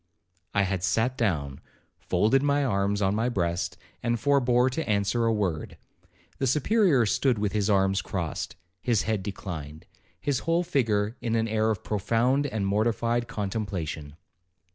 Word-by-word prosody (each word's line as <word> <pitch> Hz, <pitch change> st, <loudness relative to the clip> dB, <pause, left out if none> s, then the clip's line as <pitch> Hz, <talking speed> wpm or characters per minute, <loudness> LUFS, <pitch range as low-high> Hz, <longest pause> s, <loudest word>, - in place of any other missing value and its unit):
I 100 Hz, -, +4 dB
had 95 Hz, -2 st, -2 dB
sat 115 Hz, +7 st, +1 dB
down, 75 Hz, -, -1 dB, 0.4 s
folded 110 Hz, +9 st, +2 dB
my 145 Hz, 0 st, +2 dB
arms 100 Hz, -3 st, +1 dB
on 95 Hz, +1 st, +2 dB
my 115 Hz, +3 st, +1 dB
breast, 85 Hz, -6 st, -1 dB, 0.2 s
and 120 Hz, 0 st, 0 dB
forbore 125 Hz, -2 st, +3 dB
to 155 Hz, 0 st, -3 dB
answer 105 Hz, +3 st, +1 dB
a 115 Hz, -, +3 dB
word. 95 Hz, -8 st, -2 dB, 0.6 s
The 135 Hz, -, +1 dB
Superior 150 Hz, -, +3 dB
stood 125 Hz, +3 st, +2 dB
with 105 Hz, -1 st, 0 dB
his 105 Hz, 0 st, 0 dB
arms 95 Hz, -1 st, +3 dB
crossed, 85 Hz, -5 st, -4 dB, 0.3 s
his 115 Hz, 0 st, +1 dB
head 110 Hz, -3 st, -1 dB
declined, 80 Hz, -6 st, -6 dB, 0.3 s
his 140 Hz, -4 st, 0 dB
whole 165 Hz, +4 st, +1 dB
figure 115 Hz, -9 st, 0 dB
in 115 Hz, -1 st, -1 dB
an 115 Hz, 0 st, +1 dB
air 110 Hz, 0 st, +1 dB
of 110 Hz, -4 st, -2 dB
profound 120 Hz, +7 st, +1 dB
and 110 Hz, -7 st, -2 dB
mortified 115 Hz, +3 st, +1 dB
contemplation. 95 Hz, -8 st, -4 dB
110 Hz, 150 wpm, -27 LUFS, 95-125 Hz, 0.6 s, I